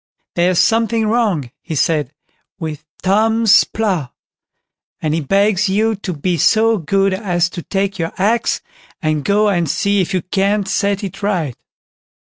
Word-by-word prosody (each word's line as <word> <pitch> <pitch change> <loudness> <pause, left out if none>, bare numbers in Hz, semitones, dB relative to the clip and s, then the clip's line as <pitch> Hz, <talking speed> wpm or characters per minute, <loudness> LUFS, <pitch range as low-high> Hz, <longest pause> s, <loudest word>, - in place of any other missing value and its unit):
"There's 175 +1 +1
something 225 +1 +2
wrong", 210 - 0
he 165 - -5
said, 150 -3 +1 0.5
"with 155 -3 -6 0.2
Tom's 220 +2 +4
plough, 190 - -2 0.9
and 155 -1 -1
he 165 - 0
begs 200 +5 +2
you 220 +3 +1
to 195 -2 -5
be 170 +3 -1
so 220 +6 +3
good 195 +4 +1
as 175 -4 0
to 175 - -7
take 195 +1 -2
your 165 0 -2
axe, 220 +5 +1 0.4
and 155 -2 -1
go 210 +4 +2
and 175 -6 +1
see 200 +3 +1
if 185 - -2
you 185 -3 -1
can't 195 +2 0
set 200 +1 0
it 195 0 -6
right." 175 - -1
195 Hz, 150 wpm, -17 LUFS, 170-210 Hz, 0.9 s, Tom's